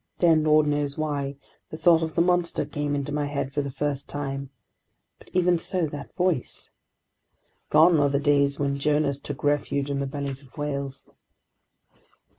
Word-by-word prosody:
Then, 165 -3 +4
lord 155 0 +5
knows 145 -1 -1
why, 145 -3 -2 0.3
the 155 - -7
thought 165 0 +5
of 160 -1 -3
the 170 - +4
monster 175 -1 +1
came 145 -1 -2
into 140 0 -3
my 145 -1 -1
head 140 -2 -3
for 145 - 0
the 140 - -4
first 140 +1 -3
time...! 140 -1 -4 0.7
But - - -18
even 180 -1 +3
so, 180 0 0
that 145 -1 -8
voice...? 180 -8 -1 1.0
Gone 160 +2 +6
are 145 -1 +3
the 140 0 +1
days 140 -1 +2
when 140 -1 -1
Jonahs 145 -1 +1
took 145 -2 -7
refuge 145 -1 0
in 140 - -1
the 140 - -1
bellies 140 -1 -5
of 135 -4 -20
whales! 140 -2 -4
145 Hz, 170 wpm, -25 LUFS, 140-155 Hz, 1.0 s, Gone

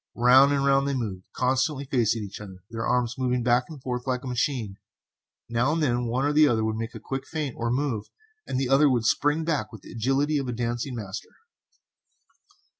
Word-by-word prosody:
Round 130 +4 +6
and 140 -1 +1
round 140 0 +3
they 140 - 0
moved, 100 -7 -4
constantly 130 +2 0
facing 120 -5 +1
each 100 0 -8
other, 95 -3 -11
their 115 0 -3
arms 125 +1 0
moving 125 -1 0
back 120 +1 +3
and 155 -3 -9
forth 125 0 -4
like 130 0 -1
a - - -6
machine. 125 -5 -2 0.7
Now 120 +5 +1
and 165 -1 0
then 120 -3 +1
one 125 +4 0
or 145 - +1
the 155 0 +6
other 115 -4 +1
would 110 0 -1
make 115 +1 -5
a - - -6
quick 135 0 -5
feint 150 -5 -3
or 115 0 -2
move, 125 -4 -1 0.4
and 130 - -1
the 135 - 0
other 140 +3 +5
would 120 -3 +1
spring 150 +7 +2
back 155 -5 -1
with 110 -4 -12
the - - -12
agility 135 +6 +1
of 135 - -4
a 125 - -2
dancing 120 +2 -3
master. 105 -2 -6
125 Hz, 210 wpm, -26 LUFS, 115-140 Hz, 0.7 s, Round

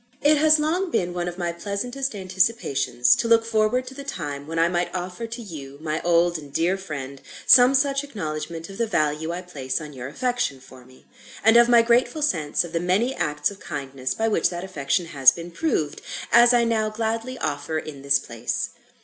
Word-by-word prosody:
IT 300 +1 +5
has 310 +1 +6
long 340 +5 0
been 175 - -1
one 175 0 -3
of 175 0 -5
my 175 -2 -2
pleasantest 230 +9 -4
anticipations 185 - +1
to 235 - -2
look 230 0 +4
forward 225 +3 +1
to 260 - -9
the 280 +1 -8
time 145 - -6
when 165 +1 -5
I 165 +1 +4
might 175 0 -1
offer 180 +5 -4
to 235 +2 -7
you, 140 -8 -9
my 155 0 -3
old 170 0 +2
and 145 -2 -12
dear 170 +6 +1
friend, 140 -8 -7 0.2
some 255 +1 +7
such 275 +1 +2
acknowledgment 165 - -5
of 195 - -11
the 230 - +1
value 155 -3 0
I 180 +1 -5
place 135 -7 -4
on 150 -2 -9
your 125 -1 -7
affection 245 - -2
for 130 -1 -16
me, 130 0 -20 0.4
and 225 +2 +5
of 235 0 +6
my 235 -1 +6
grateful 245 +6 +2
sense 155 - 0
of 170 - -9
the 165 - 0
many 190 +9 +1
acts 150 +5 -1
of 200 - -12
kindness 135 -2 -5
by 225 - 0
which 220 - +2
that 175 0 -6
affection 170 -2 -1
has 135 -5 +5
been 170 +4 -8
proved, 170 - -2 0.3
as 240 0 +7
I 240 -1 +4
now 220 -2 +1
gladly 225 +3 -3
offer 145 -1 -3
in 155 -3 -7
this 140 0 +3
place. 115 -4 -4
180 Hz, 205 wpm, -23 LUFS, 150-235 Hz, 0.4 s, some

